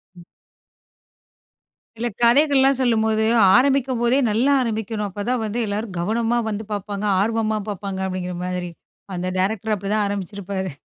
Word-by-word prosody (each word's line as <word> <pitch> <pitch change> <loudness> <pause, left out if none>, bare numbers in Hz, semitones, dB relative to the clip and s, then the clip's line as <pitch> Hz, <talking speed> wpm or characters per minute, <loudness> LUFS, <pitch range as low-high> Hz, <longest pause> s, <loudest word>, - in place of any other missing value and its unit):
ம். 175 - -13 1.7
இல்ல. 235 +2 -1
"கதைகள்லாம் 270 +2 +4
சொல்லும்போது, 220 -3 +2 0.3
ஆரம்பிக்கும்போதே 255 -2 +2
நல்லா 235 +7 +2
ஆரம்பிக்கணும். 220 -2 -2
அப்ப 205 +2 -6
தான் 250 -2 0
வந்து 220 +3 -3
எல்லாரும் 205 -1 -4
கவனமா 225 +5 0
வந்து 215 0 -4
பார்ப்பாங்க. 205 0 -4 0.2
ஆர்வமா 220 0 0
பார்ப்பாங்க." 195 -1 -5
அப்படீங்கிற 180 -1 -4
மாதிரி. 180 -1 -3 0.5
அந்த 180 +1 -3
டைரக்ட்ரு 215 +3 0
அப்படிதான் 205 +1 -1
ஆரம்பிச்சிருப்பாரு. 195 -1 -4
215 Hz, 120 wpm, -22 LUFS, 200-235 Hz, 1.7 s, கதைகள்லாம்